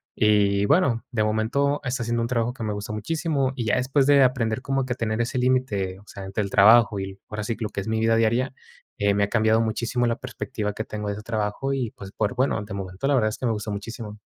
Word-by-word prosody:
y, 100 Hz, -2 st, +3 dB
bueno, 125 Hz, -, +2 dB
de 110 Hz, -4 st, +1 dB
momento 115 Hz, +7 st, +1 dB
está 125 Hz, -1 st, -1 dB
siendo 120 Hz, 0 st, -1 dB
un 115 Hz, -, 0 dB
trabajo 120 Hz, -1 st, 0 dB
que 120 Hz, -, -7 dB
me 105 Hz, -, -1 dB
gusta 105 Hz, +1 st, -5 dB
muchísimo. 140 Hz, +3 st, -1 dB
Y 125 Hz, -, -3 dB
ya 110 Hz, -, +2 dB
después 130 Hz, +2 st, +2 dB
de 140 Hz, -1 st, +6 dB
aprender 125 Hz, -2 st, +1 dB
como 135 Hz, 0 st, -1 dB
que 130 Hz, -, -6 dB
a -, -, -9 dB
tener 110 Hz, -1 st, -1 dB
ese 125 Hz, +3 st, -2 dB
límite, 115 Hz, -7 st, 0 dB
o -, -, -18 dB
sea, 100 Hz, -, -8 dB
entre 95 Hz, +2 st, -2 dB
el 100 Hz, -, -4 dB
trabajo 110 Hz, +1 st, +6 dB
y, 95 Hz, 0 st, -6 dB
ahora 105 Hz, 0 st, -4 dB
sí, 115 Hz, +2 st, -2 dB
lo 110 Hz, -3 st, -2 dB
que -, -, -5 dB
es 95 Hz, -, -8 dB
mi 110 Hz, 0 st, 0 dB
vida 115 Hz, 0 st, +3 dB
diaria, 115 Hz, +4 st, +1 dB, 0.4 s
eh, 100 Hz, 0 st, +2 dB
me 100 Hz, 0 st, +2 dB
ha 100 Hz, -, 0 dB
cambiado 110 Hz, 0 st, +3 dB
muchísimo 120 Hz, +2 st, 0 dB
la 115 Hz, 0 st, 0 dB
perspectiva 110 Hz, -5 st, -4 dB
que 110 Hz, -, -4 dB
tengo 105 Hz, -1 st, -5 dB
de 100 Hz, -, -1 dB
ese 105 Hz, -, -9 dB
trabajo 110 Hz, +4 st, -2 dB
y, 125 Hz, -5 st, -2 dB
pues, 95 Hz, -1 st, -10 dB
por 125 Hz, -, -1 dB
bueno, 125 Hz, -3 st, +1 dB
de 105 Hz, -, -8 dB
momento 95 Hz, +5 st, -4 dB
la 145 Hz, -, +3 dB
verdad 110 Hz, -4 st, +3 dB
es 105 Hz, -, -6 dB
que -, -, -4 dB
me 115 Hz, -, +1 dB
gusta 105 Hz, 0 st, -4 dB
muchísimo. 105 Hz, +1 st, -6 dB
115 Hz, 260 wpm, -24 LUFS, 105-125 Hz, 0.4 s, de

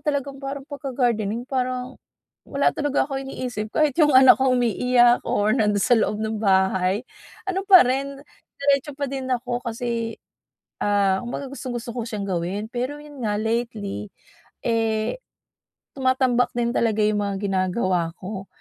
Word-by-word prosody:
talagang 280 Hz, -2 st, -2 dB
parang 275 Hz, 0 st, -4 dB
pagka 280 Hz, -2 st, -6 dB
gardening, 230 Hz, -3 st, 0 dB
parang 255 Hz, 0 st, -2 dB, 0.5 s
wala 280 Hz, 0 st, +2 dB
talaga 290 Hz, -2 st, +1 dB
akong 270 Hz, -2 st, -4 dB
iniisip, 230 Hz, -5 st, -4 dB
kahit 305 Hz, -3 st, +3 dB
yung 295 Hz, -2 st, +5 dB
anak 260 Hz, 0 st, +8 dB
ko 265 Hz, -, +3 dB
umiiyak 240 Hz, +1 st, +3 dB
or 210 Hz, +1 st, +2 dB
nando'n 210 Hz, -4 st, +2 dB
sa -, -, +2 dB
loob 215 Hz, -, 0 dB
ng 220 Hz, 0 st, -2 dB
bahay, 190 Hz, +1 st, +2 dB, 0.4 s
ano 385 Hz, 0 st, -1 dB
pa 370 Hz, -7 st, +9 dB
rin, 275 Hz, +2 st, -1 dB, 0.4 s
diretso 280 Hz, +1 st, +1 dB
pa 285 Hz, -, -2 dB
din 265 Hz, -1 st, -5 dB
ako 245 Hz, 0 st, -1 dB
kasi, 230 Hz, -1 st, -3 dB, 0.7 s
ah, 200 Hz, -2 st, +2 dB
kumbaga, 245 Hz, +3 st, -5 dB
gustong-gusto 240 Hz, -4 st, -5 dB
ko 235 Hz, -, -2 dB
siyang 210 Hz, -3 st, -4 dB
gawin. 185 Hz, +3 st, -2 dB
Pero 255 Hz, +4 st, -2 dB
yun 290 Hz, -2 st, -12 dB
nga, 205 Hz, -1 st, 0 dB
lately, 220 Hz, -, -3 dB, 0.6 s
eh 225 Hz, -, 0 dB, 0.8 s
tumatambak 260 Hz, -2 st, +2 dB
din 235 Hz, -1 st, +1 dB
talaga 225 Hz, -3 st, +1 dB
yung 210 Hz, 0 st, +1 dB
mga 200 Hz, -1 st, -2 dB
ginagawa 185 Hz, -3 st, 0 dB
ko. 195 Hz, 0 st, -6 dB
240 Hz, 150 wpm, -23 LUFS, 210-265 Hz, 0.8 s, pa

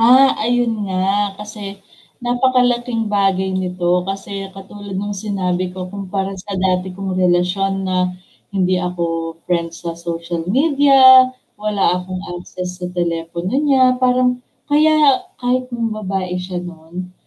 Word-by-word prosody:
Ah, 260 Hz, +4 st, +7 dB
ayun 240 Hz, +1 st, +1 dB, 0.2 s
nga 195 Hz, +2 st, 0 dB
kasi 210 Hz, -1 st, -8 dB, 0.5 s
napakalaking 245 Hz, -2 st, +1 dB
bagay 190 Hz, -1 st, +1 dB
nito 180 Hz, -1 st, 0 dB
kasi 195 Hz, 0 st, -5 dB
katulad 195 Hz, 0 st, -8 dB
nung 205 Hz, +2 st, -3 dB
sinabi 185 Hz, -3 st, -2 dB
ko 185 Hz, 0 st, -6 dB
kumpara 195 Hz, -1 st, -3 dB
sa 195 Hz, +1 st, -6 dB
dati 185 Hz, 0 st, +1 dB
kong 195 Hz, -1 st, -3 dB
relasyon 185 Hz, +2 st, +1 dB
na 185 Hz, -1 st, +1 dB, 0.4 s
hindi 185 Hz, -2 st, +1 dB
ako 165 Hz, -2 st, -3 dB
friends 170 Hz, -1 st, -2 dB
sa 170 Hz, -, -2 dB
social 170 Hz, 0 st, -5 dB
media, 270 Hz, 0 st, +6 dB, 0.3 s
wala 210 Hz, -1 st, -1 dB, 0.2 s
akong 185 Hz, +1 st, -6 dB
access 180 Hz, +1 st, -7 dB
sa 180 Hz, -, -3 dB
telepono 170 Hz, 0 st, -3 dB
niya, 280 Hz, -3 st, +3 dB, 0.2 s
parang 250 Hz, 0 st, +2 dB, 0.2 s
kaya 300 Hz, -2 st, +4 dB, 0.2 s
kahit 250 Hz, +1 st, -1 dB
nambabae 200 Hz, -6 st, -3 dB
siya 180 Hz, 0 st, -6 dB
no'n, 175 Hz, +1 st, -8 dB
195 Hz, 125 wpm, -18 LUFS, 180-230 Hz, 0.5 s, Ah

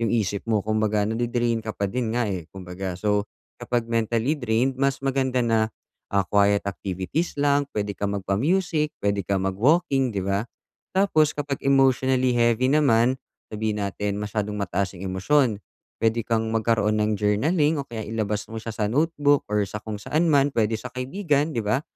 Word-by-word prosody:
yung 115 Hz, -, 0 dB
isip 105 Hz, -3 st, 0 dB
mo. 105 Hz, -3 st, +1 dB
Kung 110 Hz, 0 st, 0 dB
baga 105 Hz, -1 st, +1 dB
nade-drain 120 Hz, +1 st, 0 dB
ka 110 Hz, 0 st, -5 dB
pa 100 Hz, -, -1 dB
din 115 Hz, +1 st, -2 dB
nga 120 Hz, -, +2 dB
eh, 90 Hz, -5 st, -4 dB
kumbaga. 90 Hz, -1 st, -6 dB
So, 105 Hz, +1 st, 0 dB, 0.3 s
kapag 120 Hz, -2 st, -1 dB
mentally 115 Hz, +3 st, 0 dB
drained, 125 Hz, 0 st, 0 dB
mas 135 Hz, -1 st, +1 dB
maganda 130 Hz, -1 st, +1 dB
na, 110 Hz, -1 st, +2 dB, 0.4 s
ah, 100 Hz, -1 st, +2 dB
quiet 100 Hz, 0 st, +3 dB
activities 100 Hz, -, -3 dB
lang 145 Hz, 0 st, +2 dB
pwede 105 Hz, -1 st, -1 dB
kang 100 Hz, 0 st, -2 dB
magpa-music, 150 Hz, -, 0 dB
pwede 100 Hz, -1 st, +1 dB
kang 95 Hz, -1 st, 0 dB
mag-walking, 135 Hz, -, +2 dB
di 95 Hz, -3 st, -3 dB
ba? 100 Hz, +1 st, 0 dB, 0.5 s
Tapos 155 Hz, -6 st, +3 dB
kapag 145 Hz, -2 st, -3 dB
emotionally 130 Hz, -2 st, +3 dB
heavy 120 Hz, +2 st, +3 dB
naman, 130 Hz, -4 st, +3 dB, 0.4 s
sabihin 105 Hz, -1 st, -2 dB
natin 100 Hz, +1 st, -2 dB
masyadong 105 Hz, 0 st, -3 dB
mataas 100 Hz, 0 st, -1 dB
yung 95 Hz, -, -8 dB
emosyon. 115 Hz, 0 st, +2 dB, 0.4 s
Pwede 115 Hz, 0 st, +1 dB
kang 115 Hz, -1 st, 0 dB
magkaroon 110 Hz, -1 st, +1 dB
ng 105 Hz, 0 st, +1 dB
journaling 145 Hz, -, +2 dB
o -, -, -5 dB
kaya 115 Hz, -2 st, -6 dB
ilabas 105 Hz, -1 st, -2 dB
mo 115 Hz, -, -6 dB
siya 115 Hz, 0 st, -6 dB
sa 105 Hz, -2 st, -1 dB
notebook 145 Hz, +1 st, +2 dB
or 105 Hz, 0 st, +1 dB
sa 105 Hz, -, -5 dB
kung 110 Hz, -1 st, -5 dB
saan 155 Hz, +10 st, 0 dB
man 140 Hz, 0 st, +4 dB
pwede 110 Hz, 0 st, +2 dB
sa 110 Hz, +3 st, -7 dB
kaibigan, 145 Hz, +3 st, -1 dB
di -, -, +1 dB
ba? 110 Hz, +6 st, +1 dB
115 Hz, 175 wpm, -24 LUFS, 105-135 Hz, 0.5 s, man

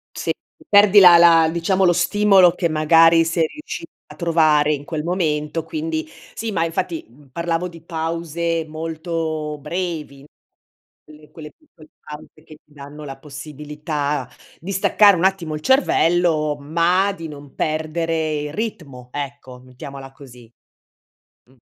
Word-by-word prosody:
Sì, -, -, -2 dB, 0.4 s
perdi 205 Hz, 0 st, +7 dB
la 180 Hz, -2 st, +9 dB
la 165 Hz, -1 st, +6 dB
diciamo, 185 Hz, +3 st, +1 dB
lo 175 Hz, -, +5 dB
stimolo 190 Hz, 0 st, +4 dB
che, 170 Hz, -2 st, -1 dB
magari, 165 Hz, +1 st, +5 dB
sei 165 Hz, 0 st, 0 dB
riusci 310 Hz, -, -8 dB, 0.2 s
a -, -, -13 dB
trovare 155 Hz, -3 st, +2 dB
in 145 Hz, -1 st, -6 dB
quel 155 Hz, -1 st, -4 dB
momento, 165 Hz, -3 st, -2 dB
quindi 320 Hz, -, -4 dB, 0.3 s
sì, 225 Hz, -, -4 dB
ma 165 Hz, -5 st, 0 dB
infatti 165 Hz, 0 st, -3 dB, 0.3 s
parlavo 170 Hz, +2 st, -2 dB
di 165 Hz, -2 st, -13 dB
pause 165 Hz, 0 st, -3 dB
molto 160 Hz, -1 st, -4 dB
brevi. 155 Hz, -3 st, -5 dB, 0.8 s
Quelle 150 Hz, 0 st, -17 dB
quelle 150 Hz, -2 st, -11 dB
piccole 165 Hz, -, -20 dB
pause 150 Hz, 0 st, -11 dB
che 155 Hz, -, -14 dB
ti 150 Hz, -, -26 dB
danno 145 Hz, +1 st, -11 dB
la 135 Hz, -1 st, -8 dB
possibilità 150 Hz, -1 st, -5 dB, 0.3 s
di 190 Hz, +4 st, -7 dB
staccare 200 Hz, +1 st, +4 dB
un 170 Hz, -, -2 dB
attimo 190 Hz, -5 st, 0 dB
il 150 Hz, -, -5 dB
cervello, 170 Hz, -, +2 dB
ma 170 Hz, +6 st, +1 dB
di 165 Hz, -4 st, -8 dB
non 145 Hz, -2 st, -12 dB
perdere 155 Hz, 0 st, -2 dB
il 150 Hz, 0 st, -6 dB
ritmo. 145 Hz, -, -6 dB
Ecco, 140 Hz, -3 st, -7 dB
mettiamola 135 Hz, +1 st, -10 dB
così. 125 Hz, -4 st, -16 dB, 0.9 s
Mh. 130 Hz, -, -26 dB
160 Hz, 140 wpm, -20 LUFS, 150-175 Hz, 0.9 s, la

